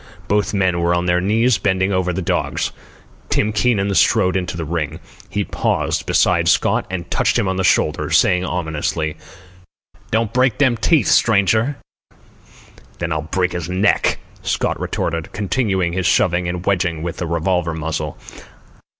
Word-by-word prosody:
Both 105 0 +1
men 95 -4 +1
were 85 +1 +2
on 85 0 -1
their 90 0 +2
knees, 110 +3 +2
bending 95 0 +1
over 95 -1 0
the 90 +1 -3
dogs. - - -1 0.6
Tim 105 0 +1
Keenan 105 -3 +1
strode 95 -1 +3
into 90 -2 -2
the 85 - -3
ring. 80 0 -3 0.3
He 105 - -1
paused - - -1
beside - - +2
Scott - - +2
and 90 -2 -5
touched - - +1
him 100 - 0
on 95 0 -1
the 95 - 0
shoulder, - - +1
saying 90 0 +3
ominously: 80 -3 -2 0.9
"Don't 115 -1 0
break 130 -2 +2
them 130 -4 +3
teeth, 135 - +2
stranger." 110 +5 +3 1.2
"Then 85 -1 -3
I'll 80 -1 -1
break 90 +3 -1
his 85 -1 -4
neck," 95 +3 +2 0.2
Scott - - -1
retorted, 80 -1 -3
continuing 100 -4 0
his 95 0 0
shoving 90 -3 +2
and 90 +1 -4
wedging 85 -4 0
with 85 -1 -4
the 85 - -3
revolver 85 0 0
muzzle. 80 -2 -4
90 Hz, 155 wpm, -19 LUFS, 85-100 Hz, 1.2 s, strode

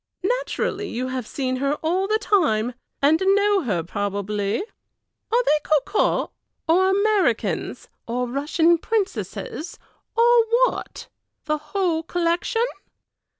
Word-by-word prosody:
"Naturally 410 -4 -3
you 255 +2 -3
have 255 -3 -4
seen 255 -2 -2
her 280 +2 0
all 365 +4 +1
the 430 +1 +2
time, 250 - +1 0.3
and 310 +4 +4
know 405 +1 +3
her 200 - -1
probably. 205 - -2 0.7
Are 485 +2 +3
they 305 -8 +3
cocottes, 310 +7 +1 0.4
or 370 +4 +4
Americans, 405 0 0 0.2
or 245 +2 -1
Russian 320 +6 +2
princesses, 410 -3 -3 0.4
or 475 0 +6 0.2
what? - - -5 0.4
the 305 0 0
whole 325 +1 -1
collection?" 350 +8 0
325 Hz, 110 wpm, -23 LUFS, 255-400 Hz, 0.7 s, or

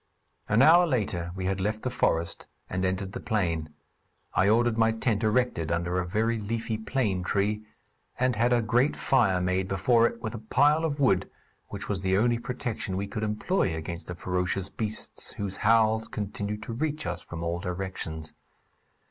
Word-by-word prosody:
An 110 +4 +5
hour 175 +4 +7
later 100 - -1
we 95 -1 -4
had 95 0 -1
left 105 +2 -1
the 125 - -1
forest 85 -8 0 0.2
and 95 +1 -1
entered 95 +1 -1
the - - -5
plain. 85 -7 -1 0.6
I 95 - +3
ordered 115 +1 +3
my 110 0 +3
tent 110 -1 0
erected 110 -8 +1
under 85 +1 0
a 90 - -2
very 110 +5 0
leafy 110 +1 -2
plane 110 -5 0
tree, 105 +3 0 0.6
and 125 -1 +2
had 120 +3 +2
a 120 -1 +3
great 120 +6 +2
fire 110 -9 +2
made 90 +1 0
before 115 +5 +3
it, 115 - -6
with 110 -1 -4
a 115 - -5
pile 145 +8 +3
of 145 -2 -2
wood, 100 -9 +3 0.4
which 100 0 -7
was 100 -3 -2
the 95 0 +2
only 120 +2 +2
protection 120 -6 -3
we 100 - -1
could 105 +2 -5
employ 105 - 0
against 85 +2 -6
the 90 - -5
ferocious 90 +2 -1
beasts 110 0 -4
whose 100 -2 -4
howls 110 0 +3
continued 105 +1 -4
to 115 - -5
reach 150 +2 -2
us 90 0 -3
from 85 -1 -7
all 85 +1 -1
directions. 90 -4 -4
105 Hz, 180 wpm, -27 LUFS, 95-115 Hz, 0.6 s, hour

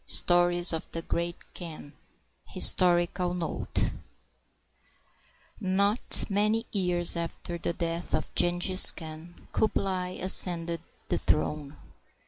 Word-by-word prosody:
VI - - +5
STORIES 175 0 +5
OF 160 - -6
THE 165 - -4
GREAT 170 0 -4 0.2
KHAN 155 -4 -10 0.5
HISTORICAL 175 0 0
NOTE 175 -2 -2 1.7
Not 200 +2 -1
many 215 +3 0
years 180 -4 +2
after 170 +1 -6
the 170 - -3
death 170 0 -4
of - - -5
Jenghiz 175 +2 +4
Khan, 160 +1 -12
Kublai 185 -4 -2
ascended 170 -3 +4 0.3
the - - -1
throne. 150 -1 -2
175 Hz, 105 wpm, -27 LUFS, 170-185 Hz, 1.7 s, VI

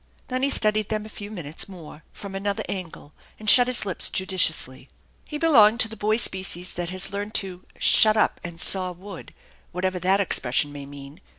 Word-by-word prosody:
Then 255 0 -2
he 275 - +2
studied 215 -5 +1
them 215 -1 -2
a - - -10
few 205 -1 -9
minutes 170 -4 -5
more 165 -4 -12
from 200 -1 -9
another 200 +1 -2
angle, 170 -5 -6 0.2
and 215 - -11
shut 245 +3 +7
his 250 -3 0
lips 190 -3 -1
judiciously. 160 -8 0 0.4
He 300 - -6
belonged 235 -9 +5
to - - +3
the 220 - -9
boy 215 +1 0
species 185 -4 -1
that 175 -1 -4
has 185 +1 0
learned 205 +2 -5
to 185 -2 -3
"shut 215 0 +5
up - - +1
and 170 -1 -8
saw 185 0 0
wood/*' 185 +1 -11 0.4
whatever 185 +1 -2
that 190 +3 +2
expression 145 -6 +1
may 140 -1 -9
mean. 140 +4 -12
190 Hz, 190 wpm, -24 LUFS, 175-215 Hz, 0.4 s, shut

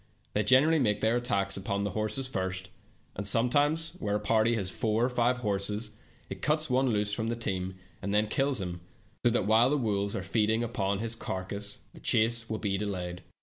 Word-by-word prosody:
They 105 - +2
generally 145 +8 +5
make 105 -6 +1
their 115 +2 +3
attacks 100 -6 0
upon 100 +1 -2
the 100 - -1
horses 110 +6 -2
first, 95 -4 -3 0.4
and 100 +1 -3
sometimes 145 +9 +2
where 105 -1 -1
a - - +1
party 110 +2 +2
has 95 -4 -1
four 110 +3 +1
or - - +1
five 125 0 +2
horses, 105 -1 -1 0.4
it - - -7
cuts 155 -1 +1
one 130 +1 +3
loose 105 -2 0
from 110 +2 -1
the 115 - -1
team, 95 -5 -3 0.3
and 100 - -3
then 105 +1 +3
kills 135 +3 +1
him, 90 -2 -5 0.4
so 120 - +5
that 120 -4 +1
while 110 +4 +5
the 150 - +2
wolves 100 -5 0
are 95 - -3
feeding 110 +3 +1
upon 100 -4 -1
his 115 +2 -3
carcass 100 0 -5 0.2
the - - -13
chase 115 +1 +2
will 110 - -1
be 100 -3 -1
delayed. 90 -4 -4
110 Hz, 200 wpm, -29 LUFS, 100-120 Hz, 0.4 s, generally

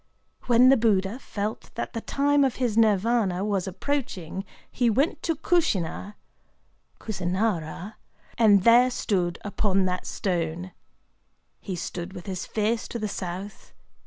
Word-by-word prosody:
When 245 +1 +6
the 270 - +6
Buddha 210 0 +1
felt 210 -4 -5
that - - -4
the 230 - -3
time 285 +3 +2
of 265 -3 +1
his 245 -5 -1
Nirvâna 210 -3 +2
was 200 -3 -1
approaching, 190 - -3 0.3
he 240 -1 +2
went 270 +9 +1
to 330 - 0
Kushina 210 - 0 0.8
[Kusinârâ], 190 -1 -2 0.4
and 205 -4 +5
there 240 +3 +6
stood 180 -8 -1
upon 195 -2 +1
that 180 0 -2
stone. 175 -1 -2 0.9
He 190 - -5
stood 175 +1 -5
with 180 -3 -9
his 185 -2 -4
face 220 +1 -1
to - - -5
the 215 -2 -2
south. 190 +1 -6
205 Hz, 130 wpm, -26 LUFS, 185-235 Hz, 0.9 s, When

